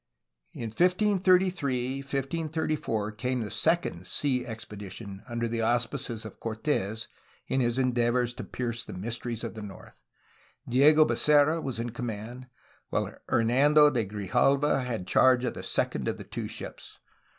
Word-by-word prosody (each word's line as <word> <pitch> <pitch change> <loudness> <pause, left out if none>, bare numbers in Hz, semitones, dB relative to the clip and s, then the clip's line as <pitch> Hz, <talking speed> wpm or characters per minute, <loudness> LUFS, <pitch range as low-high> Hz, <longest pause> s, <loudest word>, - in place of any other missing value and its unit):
In 115 - -5
1533 180 - +2
1534 140 -5 -2
came 125 +3 -2
the 105 - -5
second 160 - 0
sea 130 -4 0
expedition 100 -3 -8
under 120 0 -1
the 115 0 -2
auspices 120 -1 -1
of 110 - -10
Cortes 110 -2 -2 0.4
in 130 - +1
his 120 0 +1
endeavors 120 -1 +1
to - - -7
pierce 120 -2 -3
the - - -9
mysteries 115 +4 -3
of 115 - -4
the 110 - -8
north. 100 -2 -11 0.7
Diego 150 +5 +6
Becerra 150 +2 +3
was 130 -6 -4
in 120 0 -3
command, 120 +1 -6 0.4
while - - -1 0.2
Hernan 125 +6 +3
do 150 -1 +8
de 120 -4 +1
Grijalva 130 +8 +1
had 115 -7 -3
charge 130 +4 +4
of 125 - -1
the - - -7
second - - -1
of - - -1
the - - -8
two - - -5
ships. - - -8
120 Hz, 145 wpm, -28 LUFS, 115-145 Hz, 0.7 s, do